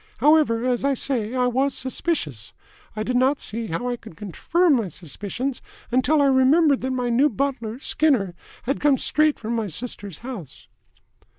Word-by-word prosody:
However, 290 -6 +3
as 250 -1 0
I 280 0 +2
say, 245 -3 -2
I 250 -1 +2
was 260 +3 +1
suspicious. 205 - -3 0.4
I 215 - -2
did 250 +3 -2
not 265 +3 +3
see 225 +1 -4
how 180 +8 -3
I 245 -1 -2
could 165 - -14
confirm 315 - +1
my 225 -4 -1
suspicions, 205 - -5 0.3
until 270 +4 +3
I - - +4
remembered 275 +2 +4
that 260 - -2
my 250 -2 -1
new 270 +6 +4
butler, 245 -3 -2
Skinner, 260 - +1 0.3
had 275 +3 -1
come 290 -2 +3
straight 305 +2 +2
from 230 +1 -3
my 225 -2 -1
sister's 200 -1 -6
house." 215 - -8
250 Hz, 170 wpm, -23 LUFS, 220-280 Hz, 0.4 s, I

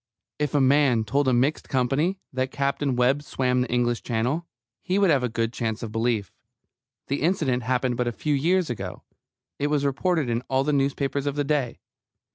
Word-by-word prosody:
If 150 -1 -1
a - - +5
man 135 -4 +4
told 135 +6 0
a - - +4
mixed 130 +5 +1
company 135 +9 +1 0.2
that 130 0 -1
Captain 140 -1 -1
Webb 125 +4 +2
swam 125 -3 0
the 125 - -2
English 120 -1 +1
Channel, 125 +9 -1 0.3
he 185 +1 -1
would 200 -4 +4
have 135 -4 +2
a 125 - 0
good 115 +1 -1
chance 110 -1 -3
of 110 - -5
belief. 115 -3 -1 0.7
The 140 - -2
incident 155 -7 +1
happened 125 0 0
but 125 - 0
a - - +1
few 150 +6 -2
years 170 +2 +2
ago; 95 -6 -6 0.6
it 145 - +1
was 145 -1 +1
reported 155 +2 +1
in 120 0 0
all 130 0 +2
the 150 +1 0
newspapers 140 0 0
of 145 - -1
the 145 - 0
day. 140 -4 -1
135 Hz, 195 wpm, -25 LUFS, 120-145 Hz, 0.7 s, a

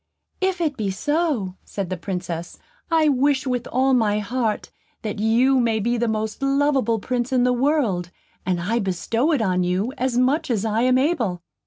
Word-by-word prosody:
"If 375 -1 0
it 305 -4 0
be 210 -4 -1
so," 265 - -1
said 195 -3 -5
the - - 0
Princess, 175 -2 -5 0.3
"I 320 -2 +3
wish, 280 0 +2
with 250 -2 -2
all 265 +2 +2
my 215 -4 +2
heart, 220 +1 -2 0.3
that 210 -1 -4
you 245 +5 +3
may 230 -2 +1
be 235 +3 0
the 235 0 0
most 220 +2 -2
lovable 275 -4 +2
Prince 245 +3 -2
in 255 -2 +3
the 250 0 +3
world, 245 - +1 0.3
and 180 -1 0
I 215 +7 0
bestow 225 - 0
it 280 -8 +2
on 185 -3 +1
you, 185 +7 0
as 255 -1 0
much 275 +6 +2
as 225 -3 0
I 220 +1 +1
am 255 +1 +4
able." 245 - 0
235 Hz, 185 wpm, -22 LUFS, 205-265 Hz, 0.3 s, am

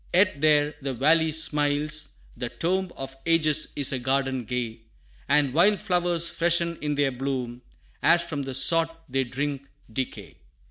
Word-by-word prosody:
Yet 185 -6 +3
there 150 -1 +3
the 135 -1 -3
valley 160 +5 +3
smiles; 150 -1 0 0.3
the 120 0 -4
tomb 185 +5 -2
Of 135 0 -7
ages 155 -2 +2
is 140 -3 +2
a 130 - -2
garden 130 0 -1
gay, 120 -2 -4 0.5
And 140 -2 +3
wild 195 +7 +4
flowers 175 -2 +1
freshen 170 0 +1
in 150 0 -1
their 140 -1 +1
bloom, 125 -2 -4 0.4
As 170 0 +4
from 155 -4 -4
the 135 -1 -5
sod 165 +4 +4 0.2
they 135 0 -1
drink 140 +2 -4 0.3
decay. 130 +2 -5
145 Hz, 150 wpm, -25 LUFS, 135-165 Hz, 0.5 s, wild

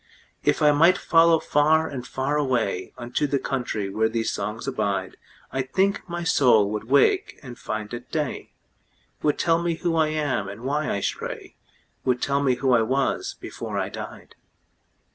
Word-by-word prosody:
If - - +2
I 150 - +7
might 165 +5 +5
follow 165 0 +4
far 160 +1 +2
and 125 -3 -6
far 135 +3 -1
awayUnto 120 0 -1
the 140 - +2
country 125 -7 -2
where 110 +2 +1
these 115 0 -1
songs 105 +5 -4
abide,I 100 +2 -4
think 190 +8 0
my 175 0 -3
soul 120 -10 +4
would 105 +1 -4
wake 370 - +2
and 125 -3 -8
find 110 -1 -5
it 120 +1 -7
day, 150 -4 -3 0.7
Would 150 - +1
tell 165 0 +2
me 170 -1 0
who 165 0 -1
I 160 -1 +3
am, 150 -10 -1
and 100 +3 -9
why 145 +4 -1
I 100 - -1
stray,—Would 125 +5 -5
tell 140 +2 0
me 130 -3 +2
who 130 0 +1
I 120 - +5
was 140 - -1
before - - -6
I - - -1
died. - - -9
135 Hz, 160 wpm, -24 LUFS, 115-155 Hz, 0.7 s, I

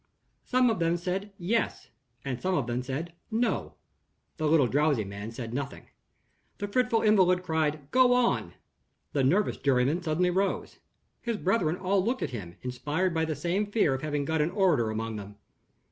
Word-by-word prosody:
Some 250 -1 +3
of 215 - -2
them 170 +1 +2
said 190 +4 -3
"Yes," 215 +6 -1 0.3
and 130 -3 -3
some 185 0 0
of 140 - 0
them 120 +1 -2
said 140 +7 -4 0.2
"No." 230 +1 -1 0.6
The 155 - 0
little 150 -3 +5
drowsy 145 -1 +2
man 100 +2 -7
said 115 0 -6
nothing. 140 +1 -5 0.7
The 205 - -3
fretful 245 +1 +1
invalid 185 -4 +4
cried, 155 -4 -1
"Go 255 0 +5
on!" 250 -1 +1 0.6
The 140 - +2
nervous 185 +10 +2
juryman 140 +5 +2
suddenly 180 +2 +1
rose. 195 +2 -1 0.4
His 235 -2 -2
brethren 185 -5 +1
all 185 +1 +1
looked 245 +5 -1
at - - -3
him, 90 -8 -7
inspired 150 +8 -1
by 160 -1 +1
the 155 -1 -2
same 175 +8 -1
fear 205 -9 +2
of 135 - -3
having 145 -2 -1
got 160 +1 +1
an 150 - +1
orator 175 - +2
among 110 0 -3
them. 100 0 -9
165 Hz, 175 wpm, -28 LUFS, 135-195 Hz, 0.7 s, little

